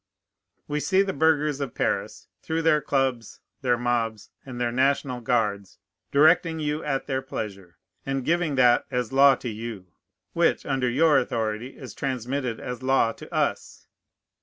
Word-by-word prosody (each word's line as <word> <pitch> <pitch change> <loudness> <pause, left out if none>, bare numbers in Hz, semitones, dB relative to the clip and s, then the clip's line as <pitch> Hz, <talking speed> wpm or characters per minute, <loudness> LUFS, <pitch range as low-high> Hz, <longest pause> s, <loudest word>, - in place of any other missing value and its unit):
We 150 0 -1
see 190 +7 +2
the 195 -1 -3
burghers 150 -1 +2
of 135 -4 -4
Paris, - - -2
through 165 +1 -2
their 155 -2 +4
clubs, 135 -5 -1 0.2
their 125 -2 +2
mobs, 115 -3 -2
and 125 -2 -8
their 120 -1 0
national 130 0 0
guards, 105 -5 -1 0.3
directing 160 +3 +4
you 150 +1 -2
at 135 -2 -2
their 130 -1 -2
pleasure, 100 -8 -7 0.3
and 135 -2 -3
giving 170 -3 +1
that 125 -2 +4
as 125 -2 -2
law 135 0 +6
to 125 - -6
you, 110 -5 -7 0.4
which, - - +1
under 130 -2 0
your 150 +3 +4
authority, 115 0 -3
is 130 -6 -9
transmitted 130 -2 -3
as 125 -1 -6
law 130 -3 +2
to - - -12
us. - - -2
130 Hz, 155 wpm, -25 LUFS, 120-145 Hz, 0.4 s, law